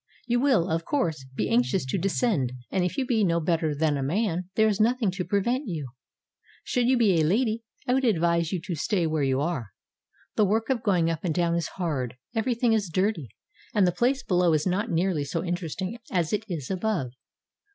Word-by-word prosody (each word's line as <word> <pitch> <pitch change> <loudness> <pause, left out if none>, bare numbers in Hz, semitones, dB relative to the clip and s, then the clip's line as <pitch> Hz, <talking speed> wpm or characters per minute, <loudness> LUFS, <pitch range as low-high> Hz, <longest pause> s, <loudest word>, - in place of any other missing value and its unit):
You. 240 0 +1
will, 245 -10 +3
of 165 -1 -1
course, 160 - -1
be 105 - 0
anxious 125 - +1
to 130 - -1
descend, 190 - 0 0.2
and 185 - +1
if 180 - -2
you 270 - +1
be 235 -4 +2
no 170 -3 +2
better 160 -2 0
than 150 -1 +1
a - - -2
man 180 +4 -1
there 220 0 +4
is 210 -1 0
nothing 230 -2 +2
to 180 0 -3
prevent 235 +9 0
you. 155 -8 -4 0.7
Should 245 -1 0
you 260 0 +4
be 195 -8 +4
a - - +3
lady 220 +7 +1 0.3
I 250 - +3
would 265 +1 +2
advise 170 -7 +2
you 185 - -1
to 175 - -4
stay 170 +3 0
where 155 -1 0
you 135 0 +1
are. 135 - -3 0.6
The 215 - +5
work 220 +5 +1
of 245 -4 0
going 175 -6 +2
up 165 -1 -4
and 165 -4 -1
down 170 -1 +1
is 170 -1 0
hard, 140 -9 -2 0.2
every 235 +2 0
thing 235 -1 +2
is 205 -5 0
dirty, 185 - 0 0.5
and 205 -3 +5
the 180 - +3
place 250 +9 +1
below 180 -3 +2
is 155 -1 +1
not 195 +5 0
nearly 170 -3 +1
so 150 +4 -2
in 175 -1 -1
teresting 185 +6 -5
as 175 -2 0
it 210 +1 -1
is 155 -5 -4
above. 185 - -1
180 Hz, 215 wpm, -26 LUFS, 160-220 Hz, 0.7 s, The